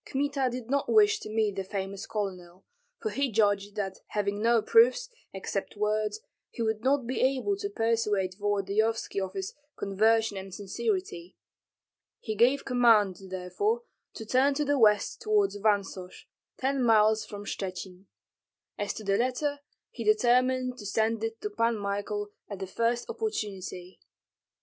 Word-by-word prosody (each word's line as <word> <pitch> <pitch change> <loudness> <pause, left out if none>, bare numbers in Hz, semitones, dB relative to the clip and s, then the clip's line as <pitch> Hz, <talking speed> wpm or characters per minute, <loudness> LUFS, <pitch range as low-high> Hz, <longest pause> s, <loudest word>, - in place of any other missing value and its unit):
Kmita 275 -1 0
did 245 -1 -6
not 280 +2 0
wish 430 0 +5
to - - -8
meet 215 -2 0
the 195 - -1
famous 195 0 -5
colonel, 185 -4 -5 0.3
for 435 - -3
he 275 -2 0
judged 205 -1 +1
that 195 -2 -3
having 205 0 -2
no 230 +1 +4
proofs, 480 +1 +4 0.2
except 195 +1 -4
words, 210 0 0 0.3
he 235 - -4
would 220 0 -1
not 270 -1 +2
be 255 +2 -2
able 270 +10 +1
to 405 0 -3
persuade 225 - 0
Volodyovski 205 +1 0
of 190 0 -4
his 195 -1 -4 0.2
conversion 220 +1 +2
and 190 -1 -7
sincerity. 370 - -3 0.8
He 220 - -4
gave 250 +6 +3
command, 225 -7 +4
therefore, 190 - -1 0.3
to 225 - -7
turn 265 +5 +3
to 295 +1 0
the 285 -1 +1
west 210 - +3
toward 425 -2 +2
Vansosh, 200 -3 -1 0.3
ten 270 +1 0
miles 220 -2 +4
from 205 -1 -8
Shchuchyn. 190 -1 -6 0.7
As 205 -1 -2
to 220 - -7
the 195 -1 +1
letter 285 +4 0 0.3
he 235 - -6
determined 250 +3 +2
to 210 - -8
send 220 +2 0
it 225 0 -3
to 210 - -3
Pan 230 +1 +1
Michael 205 +1 -3 0.2
at 200 - -5
the 190 - -4
first 230 +5 -1
opportunity. 195 - -5
220 Hz, 150 wpm, -28 LUFS, 200-255 Hz, 0.8 s, wish